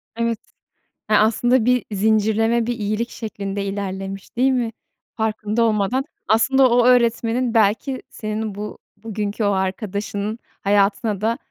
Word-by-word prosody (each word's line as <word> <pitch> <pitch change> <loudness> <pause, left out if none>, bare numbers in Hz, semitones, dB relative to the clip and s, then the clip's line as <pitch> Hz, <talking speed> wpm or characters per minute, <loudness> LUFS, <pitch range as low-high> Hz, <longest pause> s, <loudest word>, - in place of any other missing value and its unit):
Evet. 230 -1 -1 0.7
E, - - +2
aslında 230 +3 +3
bir 250 0 +2
zincirleme 220 +3 +2
bir 240 - -1
iyilik 215 +3 -1
şeklinde 200 -3 -5
ilerlemiş, 195 0 -5
değil 265 +2 +4
mi, 240 -3 0 0.4
farkında 220 0 0
olmadan? 225 +4 +1 0.2
Aslında 260 +4 +4
o 240 0 +4
öğretmenin 235 0 +2
belki 225 +5 +2
senin 215 -2 -4
bu 210 +1 -6 0.2
bugünkü 210 0 -3
o 205 - +3
arkadaşının 200 +2 -2 0.2
hayatına 200 +1 +1
da, 230 +2 +1
220 Hz, 125 wpm, -21 LUFS, 205-235 Hz, 0.7 s, değil